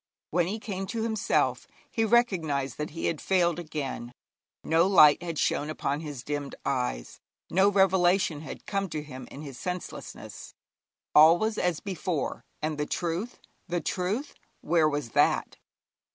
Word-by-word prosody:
When 175 +1 +2
he 205 +4 -2
came 195 -3 -4
to 225 +2 -2
himself 220 -1 0 0.2
he 225 - +1
recognised 165 - +1
that 150 - -2
he 165 - -5
had 160 - -1
failed 175 -3 +2
again. 140 -7 -5 0.5
No 165 +3 +3
light 155 -7 +7
had 170 -2 -4
shone 150 - 0
upon 145 -2 -2
his 145 -6 -7
dimmed 145 0 -4
eyes, - - -2 0.3
no 190 +3 +5
revelation 190 -4 +3
had 155 - -9
come 195 -1 -2
to 155 -1 -4
him 130 -3 -9
in 145 - -9
his 135 -4 -9
senselessness. 180 +3 -7 0.6
All 160 +3 +8
was 220 +3 -1
as 180 -3 0
before, 185 -5 -3 0.2
and 155 -1 -2
the 150 - -1
truth 175 +8 -3 0.3
the 175 -1 -1
truth, 190 - -2 0.3
where 160 -3 +3
was 145 -6 -3
that? - - +2
170 Hz, 150 wpm, -28 LUFS, 150-190 Hz, 0.6 s, All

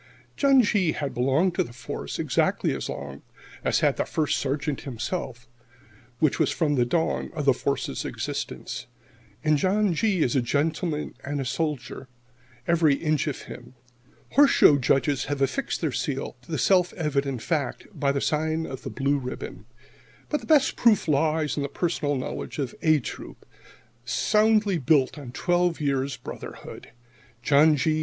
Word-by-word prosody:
John 275 -3 +5
G. 195 -6 +2
had 145 -2 -3
belonged 135 +9 +2
to - - +1
the 120 - -11
Force 120 -1 -6
exactly - - +1
as - - -5
long 70 0 -7 0.4
as - - +1
had - - +2
the - - 0
First 155 -2 0
Sergeant 140 +1 -2
himself, 125 -1 -5 0.7
which 155 -3 +1
was - - +3
from 155 -3 0
the 125 -3 +2
dawn 160 +5 0
of 150 -3 -3
the 135 - +6
Force's 140 +2 -2
existence. - - -5 0.6
And 155 -1 +3
John 195 +1 +2
G. 190 -1 +1
is 125 - 0
a 130 - +3
gentleman 150 +4 -1
and 145 +1 -3
a 135 - -2
soldier, 145 -2 -3 0.6
every 165 -4 +4
inch 155 -1 0
of 145 - -4
him. 125 +1 -11 0.6
Horse 285 0 +6
show 145 -2 +6
judges 135 +2 +1
have 145 0 -3
affixed 140 - -1
their - - 0
seal - - -3
to - - -14
the - - -1
self 180 -2 +3
evident 140 -7 -2
fact 150 -6 -2
by 140 -2 0
the 140 0 -1
sign 160 +1 0
of 130 -3 -7
the - - -6
blue 140 +1 0
ribbon,[70 125 -1 -6
1] - - -17 0.6
but 300 - -1
the - - -12
best 300 -4 +4
proof 220 -6 +3
lies 155 +1 +1
in - - 0
the 140 - -2
personal 150 -2 -1
knowledge 130 - -5
of 135 -4 -3
"A" 155 -2 +4
Troop, - - -9 0.6
soundly 210 - +2
built 140 +1 +2
on 130 -4 -8
twelve 175 +3 +1
years' 140 -2 -1
brotherhood. - - -9 0.5
John 150 +4 +5
G. 155 +2 +1
150 Hz, 165 wpm, -25 LUFS, 135-170 Hz, 0.7 s, the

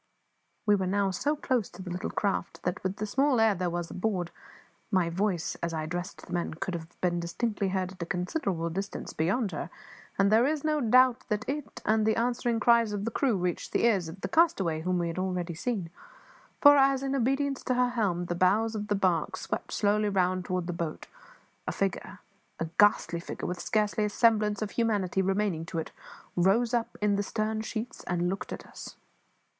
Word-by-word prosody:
We 210 - +5
were 190 -2 +1
now 195 +1 +1
so 285 +12 0
close 255 -7 0
to 185 +1 -10
the 180 - -6
little 180 +1 -3
craft 175 -4 -2
that, 180 - -2
with 190 +1 -2
the 215 - -3
small 265 +3 +2
air 225 -1 +5
there 180 -1 -1
was 175 0 -4
abroad, 185 -3 -2 0.6
my 185 -5 +2
voice, 185 -2 0
as 170 -1 -2
I 155 - -2
addressed 175 +4 -5
the 180 - -9
men, 175 -2 -2
could 180 +3 -4
have 165 -1 -7
been 175 -1 +1
distinctly 200 +4 -2
heard 185 -1 -1
at 185 -2 -12
a 170 - -3
considerable 180 - -2
distance 195 +4 -5
beyond 195 +7 0
her; 160 +1 -4 0.5
and 195 +1 +3
there 230 +4 +5
is 300 -1 -1
no 305 -1 +1
doubt 255 +1 +4
that 210 -1 -1
it 290 +1 -5
and 220 0 +3
the 220 0 +2
answering 240 0 0
cries 230 -1 +4
of 205 0 -3
the 230 - -1
crew 245 -3 +1
reached 180 -1 -2
the - - +2
ears 195 -8 +3
of 185 +4 -10
the - - -2
castaway 200 - +2
whom 180 +2 0
we 170 -1 0
had 165 +2 -3
already 180 -2 -2
seen; 190 -2 -3 0.7
for 290 0 +9
as, 270 -1 +4
in 270 0 -1
obedience 275 +2 0
to 255 - +1
her 250 0 +3
helm, 200 -8 0
the 175 - -2
bows 200 +6 +2
of 210 -1 -4
the 205 - +1
barque 180 -5 +1
swept - - -4
slowly 210 0 +2
round 185 -2 +1
towards 180 -1 -1
the 175 - -3
boat, 170 -2 -4 0.6
a - - 0
figure 195 0 -2 0.4
a 165 - 0
ghastly 205 -4 +4
figure, - - -6
with 180 0 -3
scarce 210 -1 +1
a 210 - +3
semblance 210 -2 +2
of 210 - -4
humanity 205 -5 +1
remaining 190 -3 0
to 165 +1 -6
it 160 - -3 0.4
rose 205 +7 +3
up 235 -1 -1
in 205 -1 +3
the - - +1
stern 215 +1 -2
sheets 225 +3 -5
and 175 0 0
looked 195 +1 -4
at - - -6
us. - - -10
200 Hz, 205 wpm, -29 LUFS, 180-230 Hz, 0.7 s, for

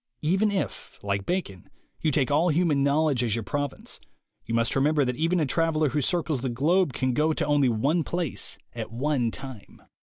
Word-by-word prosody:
Even 190 +7 +2
if, 200 -2 -4
like 100 -1 -2
Bacon, 155 - -3 0.3
you 160 - +2
take 140 -2 +1
all 160 +5 +3
human 155 -3 +2
knowledge 140 -2 +2
as 115 -3 0
your 115 - -3
province, 145 +7 -4 0.5
you 115 - -2
must 115 0 +1
remember 145 +1 +3
that 125 0 -1
even 165 +6 +1
a 155 - +2
traveler 155 +1 +1
who 150 +2 0
circles 155 -3 0
the 130 - -2
globe 150 +8 +2
can 130 +1 0
go 155 +4 +2
to - - -1
only 145 -3 +3
one 140 +9 +1
place 170 -5 -2 0.2
at - - -6
one 130 0 0
time. 130 -3 -9
145 Hz, 190 wpm, -26 LUFS, 125-160 Hz, 0.5 s, all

